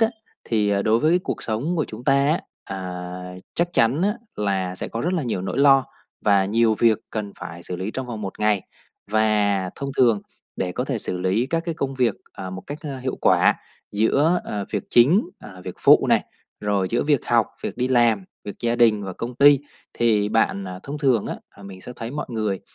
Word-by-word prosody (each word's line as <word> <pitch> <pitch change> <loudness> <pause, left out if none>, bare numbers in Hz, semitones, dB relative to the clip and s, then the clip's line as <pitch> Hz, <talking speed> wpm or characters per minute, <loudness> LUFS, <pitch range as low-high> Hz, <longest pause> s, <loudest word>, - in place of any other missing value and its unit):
á, 225 - +5 0.4
thì, 105 -3 +1
à, 100 -1 +1
đối 110 +2 +3
với 165 +6 +3
cuộc - - -3
sống 125 +11 -2
của 155 - +1
chúng 115 +3 -10
ta - - +4
á, 140 +4 +2 0.2
à, 90 -1 -6 0.2
chắc 175 0 0
chắn 130 +6 +2
á, 205 +2 +2 0.2
là 95 -3 -1
sẽ - - -2
có 115 - -4
rất 175 +7 0
là 170 - 0
nhiều 100 -6 -2
nỗi 95 - -3
lo, 135 -1 +6 0.4
và 100 -2 +4
nhiều 110 +2 +2
việc 115 -3 +4
cần 105 -2 -4
phải 85 +1 -8
xử 90 - -4
lý 95 +4 -3
trong 130 +2 -5
vòng 115 -3 -6
một 95 -2 -6
ngày. 105 -3 +2 0.5
Và 105 -3 +2
thông 140 0 -4
thường, 115 -5 +4 0.3
để 90 -1 -2
có 125 - -2
thể 130 -4 -2
xử 90 -2 -2
lý 95 +7 +1
các 165 0 0
cái 165 - -1
công 135 -3 -3
việc, 125 -3 +2 0.2
à, 95 0 -7
một 95 0 -7
cách, 145 - -5
a, 140 -4 -5
hiệu 130 0 -3
quả - - +4 0.4
giữa, 145 +11 +2
ờ, 100 -1 -3
việc - - -2
chính, 170 - +4
ờ, 95 -3 -11
việc - - -6
phụ - - +6
này, - - +3 0.4
rồi 100 -2 0
giữa 120 - +1
việc 145 -4 +1
học, 115 -2 +3 0.2
việc - - -4
đi 125 +1 0
làm, 120 -6 +3 0.2
việc 100 - -6
gia 120 0 0
đình 110 -4 +4
và 95 - -5
công 120 +6 -6
ty 145 +1 +7 0.4
thì 105 -3 +2
bạn 100 -3 +1 0.2
thông 145 +2 -6
thường 130 -7 +2
á, - - -4 0.2
là 100 - -14
mình 95 -1 -10
sẽ 125 - -9
thấy 115 0 -5
mọi 150 +3 -4
người, 110 -4 -2
115 Hz, 220 wpm, -23 LUFS, 100-135 Hz, 0.5 s, ty